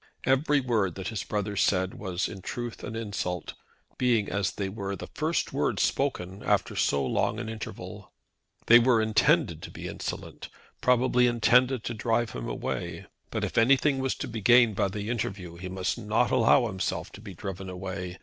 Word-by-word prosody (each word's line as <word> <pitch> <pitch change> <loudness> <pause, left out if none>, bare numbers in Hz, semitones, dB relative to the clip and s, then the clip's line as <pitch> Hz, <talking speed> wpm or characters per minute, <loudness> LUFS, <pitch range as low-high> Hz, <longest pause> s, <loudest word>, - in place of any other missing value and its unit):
Every 140 +2 +3
word 110 -8 0
that 95 -1 -4
his 110 -4 -3
brother 105 -1 -3
said 95 -1 +2
was 95 -2 -2
in 95 - -8
truth 120 +4 -5
an 110 - -5
insult, 100 -5 -3 0.5
being, 120 -5 +2
as 100 0 0
they 100 - -3
were, 100 0 -4
the - - -7
first - - -1
words - - +1
spoken 100 -9 -1
after - - +1
so 70 -1 +1
long 105 - 0
an 115 - -4
interval. 110 -1 -7 0.5
They 120 +1 +8
were 120 -1 +4
intended 110 -1 +2
to - - -7
be - - -7
insolent, - - -6 0.3
probably 125 0 +4
intended 120 +1 +3
to 120 - -3
drive 115 +1 0
him - - -5
away. - - -4 0.2
But - - -3
if - - +1
anything 135 +3 +4
was 130 0 0
to - - -5
be 110 -1 -5
gained 120 0 +6
by 100 - +2
the 105 +1 -5
interview 95 -7 -4
he 90 +1 -6
must 95 +5 -2
not 110 +2 +1
allow 125 0 +5
himself 95 -5 -3
to 105 - -12
be 100 -4 -9
driven 95 +1 -6
away. 90 0 -5
110 Hz, 180 wpm, -28 LUFS, 95-120 Hz, 0.5 s, They